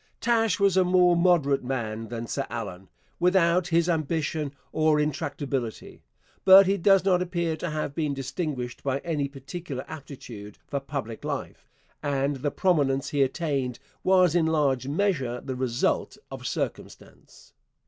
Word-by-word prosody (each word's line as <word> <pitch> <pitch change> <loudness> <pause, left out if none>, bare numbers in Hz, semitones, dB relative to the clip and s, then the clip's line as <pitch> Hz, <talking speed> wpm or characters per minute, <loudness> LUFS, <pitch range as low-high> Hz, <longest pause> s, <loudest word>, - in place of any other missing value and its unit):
Taché 225 -5 +2
was 200 -2 +3
a 190 - +5
more 180 -1 +4
moderate 170 -6 +3
man 115 -4 -3
than 115 +1 -5
Sir - - -3
Allan, 90 +1 -6 0.3
without 180 -1 +3
his 170 0 +2
ambition 155 -2 -1 0.2
or 155 -1 +3
intractability; 140 -5 -3 0.4
but 195 +1 +9
he 195 +2 +2
does 195 0 +4
not 180 -2 +3
appear 170 -2 -1
to 175 - -4
have 150 -2 -3
been 150 -2 -1
distinguished 135 -2 -4
by 135 -1 -1
any 150 -5 -1
particular 140 0 -7
aptitude 125 -9 -9
for 140 - -3
public 135 -5 -6
life, - - -5 0.3
and 140 -1 0
the 145 +3 -1
prominence 140 -6 +1
he 145 - 0
attained 135 -3 -1 0.3
was 185 -3 +4
in 170 -2 +3
large 140 -5 +1
measure 140 -7 0
the 130 0 -5
result 125 -2 -1
of - - -6
circumstance. - - -6
150 Hz, 145 wpm, -26 LUFS, 135-175 Hz, 0.4 s, but